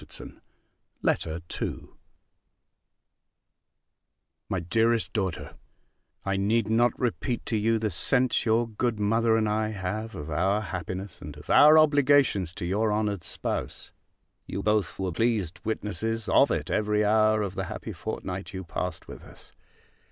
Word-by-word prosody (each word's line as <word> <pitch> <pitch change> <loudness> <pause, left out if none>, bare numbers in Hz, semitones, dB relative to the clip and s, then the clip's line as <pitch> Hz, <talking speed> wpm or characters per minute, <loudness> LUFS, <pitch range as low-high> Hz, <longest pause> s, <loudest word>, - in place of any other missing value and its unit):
_ - - -11 0.6
LETTER 80 +1 0 0.2
II - - -4 2.6
MY 95 - -1
DEAREST 115 +6 +1
DAUGHTER, 95 -6 -3 0.7
I 100 0 0
need 105 +2 +1
not 120 +2 +2
repeat 125 0 -2
to 115 - -1
you 110 +2 +2
the 110 -1 -1
sense 130 +3 +1
your 115 +1 +2
good 115 0 -2
mother 115 +2 +2
and 110 -1 +1
I 110 +1 0
have 110 +2 -4
of 75 +2 -6
our 95 +7 +1
happiness, 95 0 -6
and - - -9
of - - -7
our 150 +2 +8
obligations 145 - +4
to - - -5
your 105 +4 +1
honoured 105 -3 -1
spouse; - - -4 0.6
you 100 - -4
both 105 -5 +1
were 95 -1 -2
pleased 105 -3 0
witnesses 110 +1 -2
of - - +5
it - - -2
every 105 0 +1
hour 110 0 +3
of 100 -3 -4
the - - -3
happy - - -6
fortnight 95 +3 -5
you 95 - -5
passed 90 0 -5
with - - -10
us. - - -15
105 Hz, 145 wpm, -27 LUFS, 95-115 Hz, 2.6 s, our